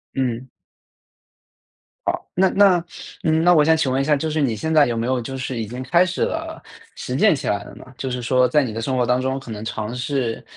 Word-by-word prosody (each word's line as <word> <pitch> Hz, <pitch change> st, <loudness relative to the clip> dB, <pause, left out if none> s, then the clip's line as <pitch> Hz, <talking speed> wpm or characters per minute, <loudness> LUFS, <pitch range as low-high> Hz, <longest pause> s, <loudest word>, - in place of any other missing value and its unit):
嗯。 130 Hz, -1 st, -2 dB, 1.6 s
好， -, -, -1 dB
那 190 Hz, +2 st, +3 dB
那 195 Hz, -3 st, +5 dB, 0.4 s
嗯， 160 Hz, -1 st, +2 dB
那 175 Hz, +1 st, +6 dB
我 150 Hz, -3 st, +5 dB
想 160 Hz, +1 st, +5 dB
请 145 Hz, -5 st, 0 dB
问 130 Hz, +1 st, +1 dB
一 -, -, -1 dB
下， 150 Hz, 0 st, +3 dB
就 155 Hz, +2 st, -2 dB
是 155 Hz, -, -1 dB
你 130 Hz, -6 st, +1 dB
现 160 Hz, +9 st, -2 dB
在 150 Hz, -2 st, +6 dB
有 120 Hz, -, -2 dB
没 115 Hz, 0 st, -2 dB
有 130 Hz, 0 st, 0 dB
就 135 Hz, +3 st, -6 dB
是 130 Hz, -2 st, -4 dB
已 110 Hz, -, -3 dB
经 125 Hz, +4 st, -6 dB
开 170 Hz, +7 st, +3 dB
始 185 Hz, 0 st, -4 dB
了， -, -, -3 dB, 0.3 s
实 125 Hz, -, -4 dB
践 215 Hz, 0 st, +4 dB
起 135 Hz, -, -5 dB
来 100 Hz, -1 st, 0 dB
了 -, -, -12 dB
呢？ -, -, -12 dB
就 130 Hz, -, -4 dB
是 125 Hz, 0 st, -3 dB
说 125 Hz, +1 st, +3 dB
在 145 Hz, +4 st, +3 dB
你 125 Hz, -, -3 dB
的 115 Hz, +1 st, -5 dB
生 130 Hz, +3 st, -1 dB
活 125 Hz, -, +2 dB
当 125 Hz, +2 st, +1 dB
中， 130 Hz, +1 st, -1 dB
可 135 Hz, -4 st, -9 dB
能 105 Hz, -1 st, -6 dB
尝 110 Hz, 0 st, -4 dB
试 125 Hz, -2 st, -2 dB
130 Hz, 265 characters per minute, -21 LUFS, 120-155 Hz, 1.6 s, 那